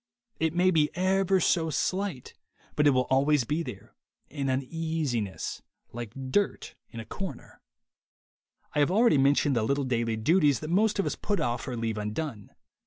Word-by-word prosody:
It 160 0 0
may 185 +1 +4
be 155 -3 +3
ever 190 +1 +2
so 165 -1 +2
slight, 185 -3 -2 0.4
but 150 0 +3
it - - +8
will 130 -2 +2
always 140 +1 +3
be 150 +8 -1
there, 110 - -8 0.4
an 140 -2 -2
uneasiness, 135 - -2 0.3
like 120 +3 -7
dirt 205 +7 0 0.2
in 115 - -9
a 110 - -7
corner. 190 - -7 1.1
I - - 0
have 145 - +3
already 205 - +4
mentioned 140 0 +3
the 115 - +2
little 140 +6 0
daily 115 -3 -1
duties 145 +4 +3
that 155 +1 -5
most 210 +4 +2
of 195 - +1
us - - -2
put 205 -1 -2
off 120 0 -2
or 125 -2 -4
leave 115 -1 -2
undone. 105 +1 -4
145 Hz, 170 wpm, -28 LUFS, 120-170 Hz, 1.1 s, it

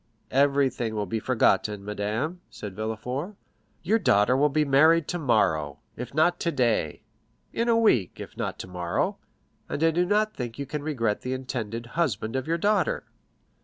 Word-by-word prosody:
"Everything 135 -4 +2
will 105 -1 -1
be 110 +4 -2
forgotten, 105 -4 +1
madame," 110 - -3
said 100 -3 -8
Villefort. 125 - -4 0.5
"Your 215 +7 +2
daughter 105 - +3
will 145 +3 +3
be 150 +2 +1
married 155 +4 +5
tomorrow, 105 - +1 0.2
if 125 - -6
not 175 +3 +3
today—in 130 - -2
a 230 - +4
week, 125 - +2
if - - -8
not - - -3
tomorrow; 90 -2 -2 0.5
and 150 - -2
I 165 - +5
do 175 +3 +2
not 210 +3 +1
think 120 -2 -5
you 140 - -4
can 150 +2 -4
regret 115 -8 -1
the 125 - -3
intended 120 -3 -4
husband 115 - -1
of 130 +1 -2
your 165 +1 +1
daughter." 210 - +1
130 Hz, 155 wpm, -26 LUFS, 110-165 Hz, 0.5 s, married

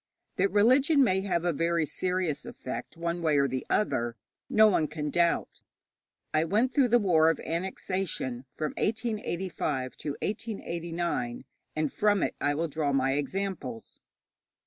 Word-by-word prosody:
That 195 +2 +3
religion 260 - +5
may 190 -6 +2
have 175 -3 -1
a 175 - +2
very 165 +1 +1
serious 180 -1 -1
effect 125 +4 -7
one 170 +1 -2
way 155 -3 +2
or 140 0 +4
the 130 0 -3
other, 120 - +1 0.3
no 220 0 +6
one 165 -7 +2
can 150 -1 -4
doubt. 170 +1 +1 0.7
I 155 - +3
went 215 +9 +1
through 275 -4 +4
the 240 +1 +5
war 165 -7 +4
of 165 - 0
annexation, 170 -7 -3
from 155 -1 -1
1885 190 - -2
to - - -4
1889, 170 - -3 0.3
and 155 -2 -1
from 205 -2 +2
it - - 0
I 145 0 +1
will 165 +3 0
draw 150 -1 -1
my 135 -1 +2
examples. 145 - -4
170 Hz, 145 wpm, -28 LUFS, 150-200 Hz, 0.7 s, no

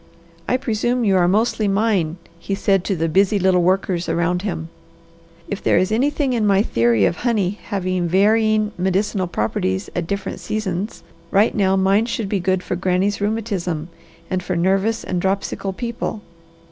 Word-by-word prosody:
"I 255 - +3
presume 240 -1 0
you 195 -2 +3
are 175 -1 +3
mostly 215 +2 +1
mine," 195 -5 +1 0.2
he 195 - -3
said 195 -2 +1
to 195 - 0
the 165 -1 0
busy 195 +5 +3
little 185 -1 +3
workers 185 -1 0
around 170 +2 0
him. 170 -5 -4 0.8
"If 200 - -4
there - - +3
is 185 +3 +1
anything 270 +3 +1
in 220 -3 +1
my 200 0 +4
theory 115 - +2
of 170 - 0
honey 210 -5 0
having 185 -3 -1
varying 215 +3 +3
medicinal 190 +1 0
properties 100 - -2
at 170 -2 -2
different 200 +1 -4
seasons, 205 -1 -3 0.3
right 205 +4 +3
now 195 -2 +2
mine 195 +4 +2
should 230 -4 -3
be 200 - 0
good 185 0 0
for 180 - -2
Granny's 185 +3 0
rheumatism 200 -7 -2 0.4
and 185 -1 -1
for 180 0 -3
nervous 195 +6 +1
and 180 -1 -2
dropsical 195 +1 -1
people. 235 0 -4
195 Hz, 165 wpm, -20 LUFS, 180-215 Hz, 0.8 s, my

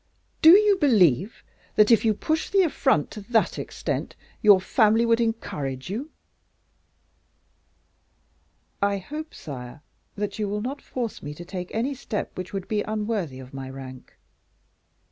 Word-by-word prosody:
Do 330 +4 +10
you 415 -1 +4
believe 200 - +3 0.3
that, 210 +2 +5
if 225 - +5
you 220 -2 +2
push 315 +9 -1
the 390 -1 +4
affront 270 - +1
to 215 - -8
that 225 -2 +2
extent, - - -4 0.3
your 205 -3 +7
family 220 +3 +3
would 230 0 +3
encourage 145 - -3
you?" 255 +9 -4 2.7
"I 200 0 +2
hope, 300 - -7
sire, 135 0 -9 0.3
that 205 +1 -4
you 210 -2 -1
will 210 +1 -2
not 270 +5 -4
force 240 -4 -5
me 145 0 -7
to 175 - -9
take 180 0 -6
any 240 +6 -1
step 235 -5 -5
which 185 0 -6
would 195 -2 -5
be 210 -1 0
unworthy 210 - -3
of 130 0 -12
my 135 -1 -6
rank." 130 -1 -10
210 Hz, 145 wpm, -25 LUFS, 175-235 Hz, 2.7 s, Do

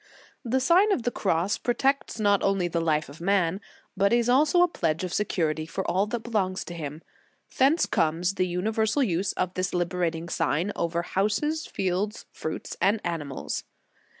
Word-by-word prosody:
The 255 +1 +1
Sign 355 +10 +4
of 265 - +1
the 245 - 0
Cross 185 -1 0
protects 265 0 0
not 205 -2 +3
only 195 -3 +1
the 170 -1 -1
life 155 -2 +1
of 145 +4 -12
man, 190 0 +1 0.3
but 200 +1 +2
is 235 0 +3
also 300 +7 +5
a - - +4
pledge 160 - -1
of 180 - -3
secur 175 -6 0
ity 155 0 -5
for 185 +3 -4
all 190 +4 +1
that 230 +2 -3
belongs 195 -5 -1
to 175 - -7
him. 155 -1 -6 0.5
Thence 280 +5 +4
comes 175 -2 +1
the 185 -1 0
universal 220 +8 0
use 185 -3 0
of 185 0 -2
this 185 0 -2
liberating 170 -1 -1
sign 170 +3 0
over 170 0 -1
houses, 255 - 0
fields, 195 +3 -2
fruits 160 - -5
and 210 +3 +3
animals. 150 -5 -3
190 Hz, 175 wpm, -26 LUFS, 170-225 Hz, 0.5 s, also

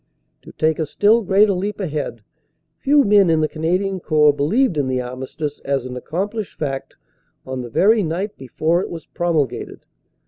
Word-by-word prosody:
To - - -13
take 155 0 0
a 160 - -1
still 215 +9 +3
greater 200 +1 +4
leap 200 +4 -3
ahead, 150 - -4 0.6
few 285 +1 +4
men 205 -5 +5
in 160 -1 +3
the 155 - +2
Canadian 185 +5 -1
Corps 150 -3 +4
believed 185 - +1
in 145 -3 0
the 130 -1 0
armistice 130 +4 -5
as 135 -2 -2
an 125 0 -6
accomplished 200 - -4
fact 135 -3 -4 0.5
on 130 -1 -4
the 120 - -7
very 215 - +4
night 185 +4 -3
before 155 +7 0
it - - -5
was 165 -2 -8
promulgated. 165 -5 -2
160 Hz, 170 wpm, -20 LUFS, 140-200 Hz, 0.6 s, men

